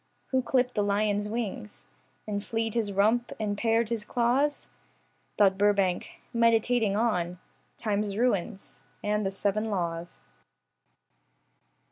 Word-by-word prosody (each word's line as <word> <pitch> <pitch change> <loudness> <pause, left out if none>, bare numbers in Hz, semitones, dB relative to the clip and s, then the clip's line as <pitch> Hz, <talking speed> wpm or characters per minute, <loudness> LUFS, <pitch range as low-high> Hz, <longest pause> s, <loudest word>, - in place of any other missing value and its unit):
Who 260 -1 +3
clipped 250 0 +1
the 210 - +1
lion's 205 0 +1
wings 200 - -5 0.4
And 205 -1 -2
flea'd 225 -1 -2
his 220 -4 0
rump 220 +5 +2
and 210 -2 -1
pared 225 +1 +1
his 230 -3 -2
claws? 250 +6 +1 0.7
Thought 195 -1 +4
Burbank, 200 -3 +1
meditating 230 -2 +3
on 180 -6 0 0.4
Time's 205 -2 -1
ruins, 215 -4 -1 0.2
and 210 0 0
the 195 - 0
seven 200 +2 -1
laws. 170 -3 -3
210 Hz, 115 wpm, -28 LUFS, 200-230 Hz, 0.7 s, Thought